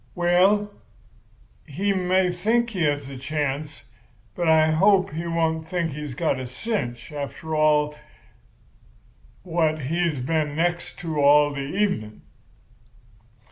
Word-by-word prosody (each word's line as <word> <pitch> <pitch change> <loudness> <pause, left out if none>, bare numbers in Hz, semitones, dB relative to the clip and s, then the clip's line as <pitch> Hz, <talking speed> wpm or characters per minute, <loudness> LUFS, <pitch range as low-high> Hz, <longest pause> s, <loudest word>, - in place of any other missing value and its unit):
'Well, 190 +4 +3 1.0
he 195 +7 -1
may 185 0 +1
think 235 +6 +1
he 190 -5 -4
has 145 -2 -1
a 135 -2 -8
chance; 145 +1 -3 0.5
but 175 -1 -2
I 160 0 +5
hope 190 +3 +3
he 165 +2 -4
won't 160 -1 -1
think 170 -2 -1
he's 150 -2 -6
got 150 -3 0
a 130 - -5
cinch, 125 - -4
after 150 +2 -5 1.9
what 160 -3 0
he's 165 +2 0
been 150 +3 -1
next 175 +2 -1
to 160 -3 -3
all 145 +1 +5
the 140 - -4 0.2
evening. 110 - -1
160 Hz, 120 wpm, -24 LUFS, 145-180 Hz, 1.9 s, I